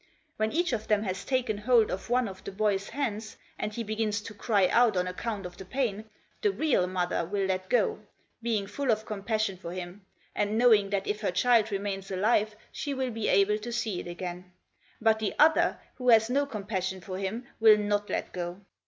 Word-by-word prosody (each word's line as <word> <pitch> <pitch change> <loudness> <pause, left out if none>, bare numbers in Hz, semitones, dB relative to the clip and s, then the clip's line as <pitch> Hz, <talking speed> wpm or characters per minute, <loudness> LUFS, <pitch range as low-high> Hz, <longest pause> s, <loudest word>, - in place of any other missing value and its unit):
When 220 0 0
each 345 -3 0
of 220 -2 -2
them 210 -1 +2
has 190 -1 -3
taken 250 -5 -1
hold 230 0 +4
of 190 - -5
one 245 -1 +2
of 190 -1 -9
the - - -6
boy's 200 -1 0
hands, 220 -6 -3 0.2
and 210 - -2
he 230 +2 -4
begins 215 -1 -1
to 215 +1 -9
cry 205 -2 +2
out 235 -5 +4
on 180 - +1
account 195 +2 -4
of 180 0 -8
the - - -8
pain, 220 0 -2 0.4
the 425 - +3
real 305 - +1
mother 180 -1 -1
will 195 +3 -1
let 185 0 -2
go, 235 -4 +2 0.4
being 225 -4 0
full 255 +7 -3
of 220 -1 +2
compassion 215 -1 -2
for 170 -2 -7
him, 180 +2 -7 0.3
and 210 +1 0
knowing 220 -4 +5
that 195 -1 -1
if 210 +1 -2
her 205 - 0
child 220 +4 +3
remains 195 -1 -3
alive 210 +2 +1 0.2
she 285 -2 -4
will 260 -1 -1
be 225 -1 -2
able 210 +2 +3
to 240 +3 -6
see 225 -5 -2
it - - -7
again; 180 +1 -6 0.5
but 220 -1 +3
the 215 -2 -2
other, 315 +2 +4 0.2
who 250 -1 0
has 225 0 +6
no 280 +2 +2
compassion 195 -5 -3
for 185 +1 -6
him, 210 +6 -3
will 220 -1 +7
not 205 0 -1
let - - -3
go. 175 0 -4
210 Hz, 205 wpm, -28 LUFS, 195-230 Hz, 0.5 s, will